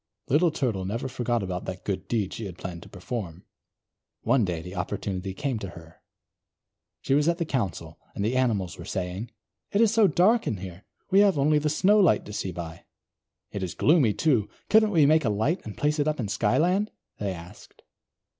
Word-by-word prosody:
Little 160 +6 +4
Turtle 125 -11 -1
never 115 +7 -3
forgot 120 -3 -1
about 90 -1 -4
that 95 0 -6
good 100 -2 -3
deed 105 -5 -1
she 110 - -5
had 90 -2 -9
planned 85 -2 -7
to - - -13
perform. 95 -8 -6 0.8
One 120 +1 +3
day 90 -4 -2
the 90 +1 -8
opportunity 95 0 -4
came 130 0 -2
to 95 - -6
her. 80 -1 -14 1.0
She - - 0
was 145 +2 +3
at 170 0 +2
the 170 - -1
Council, 90 - -3 0.2
and 100 - -1
the 120 +4 0
animals 100 -8 0
were - - -7
saying: 95 +5 -4 0.4
"It 200 - +1
is 225 -1 +4
so 220 -3 +5
dark 210 +7 +3
here, 95 -2 -5 0.3
we 195 - +6
have 200 -5 +5
only 150 +2 +3
the 150 +1 0
Snowlight 195 +4 +4
to 105 - -8
see 95 -2 -3
by. 85 -1 -8 0.7
It 100 - -4
is 90 -3 -4
gloomy, 140 -9 +4
too. 125 -10 +2 0.2
Couldn't 220 0 +6
we 165 -7 +4
make 155 +2 +4
a 115 - +1
light 110 - 0
and 105 - -8
place 150 +1 0
it 145 - +1
up 155 -2 0
in 110 -5 -2
Skyland?" 170 - +2 0.3
they 100 -2 -1
asked. 90 +2 -12
115 Hz, 195 wpm, -26 LUFS, 95-155 Hz, 1.0 s, we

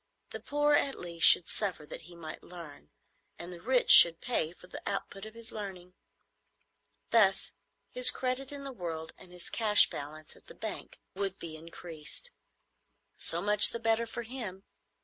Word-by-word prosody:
The - - -8
poor 295 +1 -1
at 280 -2 0
least 170 -1 +1
should 175 - +6
suffer 185 -7 -3
that - - -10
he 175 +2 -16
might 160 -2 -11
learn, 165 - -14 0.5
and 175 +1 -10
the 170 - -13
rich 250 +4 +1
should 165 -1 +9
pay 165 -10 -3
for 180 - -18
the 180 - -11
output 200 +1 -7
of 220 - -15
his 230 -1 -10
learning. 185 -4 -9 1.2
Thus 200 -4 +1 0.4
his - - +9
credit 260 +1 -4
in 285 -1 -9
the 275 - -8
world 165 -8 -7
and 180 - -17
his 180 -1 -13
cash 215 -2 +3
balance 150 +2 -10
at - - -18
the - - -14
bank - - -9 0.2
would 195 -1 -5
be 165 -2 -10
increased. 165 - -8 0.9
So 170 +2 -2
much 210 0 +7
the 235 - -5
better 225 0 -1
for 235 +1 -7
him. 220 -6 -9
195 Hz, 170 wpm, -29 LUFS, 170-230 Hz, 1.2 s, should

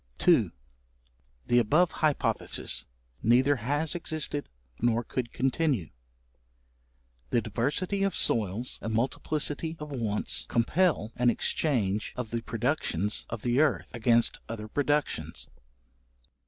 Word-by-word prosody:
§2. - - +4 0.9
The 120 - +4
above 155 +10 +3
hypothesis 150 -2 0 0.4
neither 130 +5 +4
has 145 +7 -1
existed 155 -4 -2 0.3
nor 120 0 +2
could 120 +1 -4
continue. 135 - 0 1.4
The 120 - +3
diversity 140 - -1
of 195 0 +1
soils 110 +2 +1
and 110 0 -2
multiplicity 150 +6 0
of 150 -1 -7
wants, 110 -6 -1
compel 120 - +1
an 125 0 +4
exchange 110 -6 0
of 125 -3 -5
the 115 0 -1
productions 110 - -1
of 115 -2 -5
the 120 +2 +2
earth, 155 -3 +2
against 115 0 +2
other 110 -2 -5
productions. 145 +4 -1
125 Hz, 110 wpm, -28 LUFS, 115-150 Hz, 1.4 s, 2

